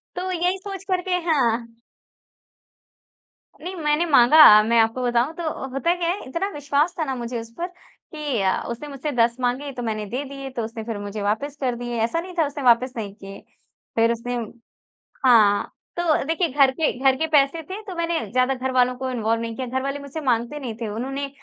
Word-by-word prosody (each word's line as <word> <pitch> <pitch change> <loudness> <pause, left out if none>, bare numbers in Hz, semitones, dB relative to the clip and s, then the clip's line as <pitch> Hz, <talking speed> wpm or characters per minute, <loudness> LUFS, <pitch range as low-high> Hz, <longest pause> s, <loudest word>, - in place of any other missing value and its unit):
तो 370 +1 -3
यही 360 +2 0
सोच 390 0 -7
कर 365 -1 +2
के 360 - +2
हाँ। 230 -5 0 1.8
नहीं, 370 +2 -6
मैंने 305 0 +1
माँगा। 265 -5 +8
मैं 230 +1 +3
आपको 225 +3 +2
बताऊँ 245 +5 +1
तो 335 -2 -2 0.2
होता 305 +7 +1
क्या 340 -1 -1
है 385 +3 -2
इतना 335 +9 -2
विश्वास 290 +1 0
था - - +2
ना 265 -1 -2
मुझे 240 0 -4
उस 225 - -11
पर 350 +1 -2
कि 305 - -6
अ, 190 -1 +1
उसने 265 +6 -6
मुझसे 285 +1 -4
10 235 -2 +2
माँगे 260 +3 -1
तो 245 - -5
मैंने 215 -2 -2
दे 260 +4 -3
दिए। 275 -1 -7
तो 240 -3 -4
उसने 225 0 -7
फ़िर 225 -2 -4
मुझे 205 +1 -5
वापस 220 +8 -1
कर 250 -2 0
दिए, 240 0 -4
ऐसा 285 +9 0
नहीं 360 +1 -7
था 320 - +4
उसने 285 -1 -6
वापस 250 +1 +4
नहीं 205 -3 -4
किए। 195 -1 -10 0.6
फ़िर 230 0 +3
उसने 245 +1 -3 0.9
हाँ, 215 -5 +5 0.3
तो 335 -5 +2
देखिए 330 +3 +1
घर 270 -1 +4
के 315 +2 0
घर 265 -1 +4
के 320 +4 -1
पैसे 295 +1 +3
थे 385 +6 -7
तो 370 - -6
मैंने 335 0 0
ज़्यादा 255 +1 +2
घरवालों 255 -1 +1
को 260 0 -3
इन्वॉल्व 230 -1 0
नहीं 230 -1 -4
किया। 260 -1 -4
घर 260 +2 -2
वाले 275 +1 -3
मुझसे 280 +3 -7
माँगते 245 +2 0
नहीं 245 -5 -5
थे, 225 - -2
उन्होंने 270 +6 -3
265 Hz, 205 wpm, -23 LUFS, 235-310 Hz, 1.8 s, माँगा